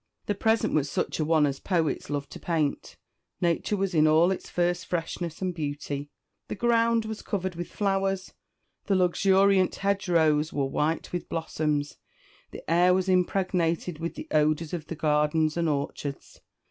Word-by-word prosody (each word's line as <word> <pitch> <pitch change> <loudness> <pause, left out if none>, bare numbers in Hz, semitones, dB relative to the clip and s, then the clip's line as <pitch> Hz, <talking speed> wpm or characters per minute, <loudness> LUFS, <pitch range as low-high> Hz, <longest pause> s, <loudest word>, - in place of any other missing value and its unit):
The 205 - 0
present 220 +3 +1
was 145 -2 +1
such - - -2
a - - +2
one 155 -1 +3
as 140 -1 -2
poets 170 -5 -1
love 145 -1 -2
to - - -9
paint. 155 -4 -2 0.4
Nature 175 +4 0
was 195 -1 -1
in 155 -1 +4
all 160 +4 +5
its 190 - -4
first 175 0 0
freshness 170 0 -3
and 185 -1 -1
beauty 145 -2 -4 0.4
the - - -4
ground 230 0 +2
was 220 0 -5
covered 190 -2 -3
with 175 0 -5
flowers, 195 -2 -1 0.5
the 200 - +1
luxuriant 190 +1 +3
hedgerows 165 -6 +1
were 140 -2 0
white 150 +6 -1
with 175 - -4
blossoms, 150 -3 -2 0.5
the - - -11
air 175 +2 +4
was 185 0 0
impregnated 180 -3 0
with 170 +1 -4
the - - -7
odours 155 +1 +1
of 165 -3 -4
the 165 - -5
gardens 150 0 +1
and 170 -1 +1
orchards. 140 -1 -4
170 Hz, 160 wpm, -27 LUFS, 155-190 Hz, 0.5 s, all